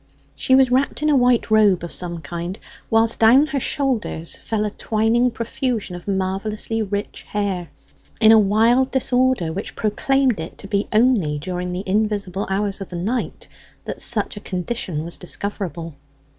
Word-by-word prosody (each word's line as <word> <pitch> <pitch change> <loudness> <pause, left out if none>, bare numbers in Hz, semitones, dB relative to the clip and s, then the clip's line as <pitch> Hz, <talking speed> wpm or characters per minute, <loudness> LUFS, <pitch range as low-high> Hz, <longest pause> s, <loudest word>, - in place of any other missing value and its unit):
She 260 - +2
was 260 -1 +4
wrapped 270 +3 +1
in 305 - +3
a - - +4
white 245 -3 +3
robe 205 -5 +4
of 170 - -6
some 170 -2 -4
kind, 170 +5 -5 0.3
whilst 225 0 +3
down 240 +6 +6
her 290 -2 -2
shoulders 250 - -2
fell 215 -1 -2
a 210 - -2
twining 225 +4 +1
profusion 235 -4 -3
of 175 - -10
marvellously 200 +3 -2
rich 205 0 -4
hair, 195 -4 -2 0.5
in 220 -1 +7
a 225 - +8
wild 225 +6 +3
disorder 255 -9 +1
which 195 +4 -6
proclaimed 255 +2 +1
it 160 - -7
to 195 - -7
be 200 0 0
only 215 -10 +3
during 180 +3 -4
the 180 +2 -4
invisible 200 -1 0
hours 195 0 -1
of 195 - -6
the 180 - -7
night 215 +9 -3 0.4
that - - -6
such 215 -3 0
a - - -6
condition 185 -4 -4
was 170 - -2
discoverable. 175 -4 -5
210 Hz, 165 wpm, -21 LUFS, 185-240 Hz, 0.5 s, a